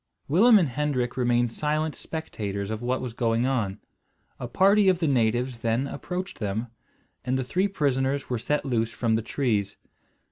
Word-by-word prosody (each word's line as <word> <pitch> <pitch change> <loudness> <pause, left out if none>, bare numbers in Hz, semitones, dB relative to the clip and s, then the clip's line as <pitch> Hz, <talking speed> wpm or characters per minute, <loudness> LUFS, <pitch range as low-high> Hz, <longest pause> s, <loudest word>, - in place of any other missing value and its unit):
Willem 215 - +6
and 175 -6 +3
Hendrik 125 -2 -1
remained 120 -2 +1
silent 155 +4 -1
spectators 105 -10 -5
of 110 0 -4
what 125 +1 -1
was 125 -3 -5
going 115 0 +1
on. 115 -7 -1 0.6
A 125 - -4
party 195 - +4
of 185 - +3
the 170 - -1
natives 120 -1 +1
then 115 +3 0
approached 180 +6 -5
them, 110 +3 -2 0.5
and 130 +1 0
the 130 - -1
three 185 +10 0
prisoners 140 -6 0
were 125 -2 -2
set 150 +6 -1
loose 115 -4 0
from 115 -2 0
the 110 - +2
trees. 110 -5 -1
125 Hz, 170 wpm, -26 LUFS, 115-150 Hz, 0.6 s, Willem